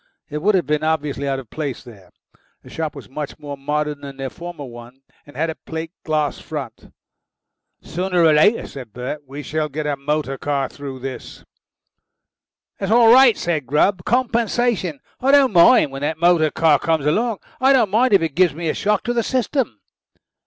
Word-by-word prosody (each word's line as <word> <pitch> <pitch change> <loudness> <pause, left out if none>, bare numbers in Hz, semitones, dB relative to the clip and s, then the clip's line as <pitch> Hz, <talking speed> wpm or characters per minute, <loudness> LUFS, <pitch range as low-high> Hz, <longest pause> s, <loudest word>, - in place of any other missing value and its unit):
It 150 0 -3
would 205 +4 +3
have 180 - +1
been 150 +2 0
obviously 150 -3 -1
out 135 -1 0
of 130 -5 -10
place 145 -5 -4
there. 100 -8 -15 0.5
The - - -14
shop 160 -2 -4
was 140 - -10
much 145 +2 -6
more 145 -1 -7
modern 150 +1 -2
than 140 -1 -9
their 135 -1 -5
former 170 -4 -8
one, 120 +2 -12 0.2
and 145 - -14
had 160 +2 0
a - - -6
plate 160 0 -5
glass 155 -2 -1
front. 145 -7 -8 0.9
"Sooner 180 0 0
or 160 -2 +6
later," 205 +10 +4
said 125 -6 -10
Bert, 125 +4 -5
"we 140 +2 -8
shall 155 +2 -2
get 150 +2 -4
a 145 -1 0
motor 140 -1 -2
car 140 -2 -1
through 135 -2 -8
this." 130 0 -8 1.3
"That's 195 +1 -2
all 230 0 +7
right," 260 -2 +6
said 160 -6 -2
Grubb. 175 +5 +2
"Compensation. 235 - 0 0.2
I 260 - 0
don't 275 -4 +5
mind 175 - +6
when 135 0 -7
that 155 +2 -1
motor 170 -2 +3
car 155 -2 +3
comes 160 -3 0
along. 220 +8 +1 0.2
I 265 +1 +4
don't 245 -7 +3
mind 245 +5 +3
even 175 -4 +3
if 160 - -3
it - - -32
gives 175 -4 +3
me 165 0 -3
a - - 0
shock 210 0 0
to 240 - -1
the 235 - +1
system." 255 - -1
155 Hz, 195 wpm, -20 LUFS, 140-195 Hz, 1.3 s, all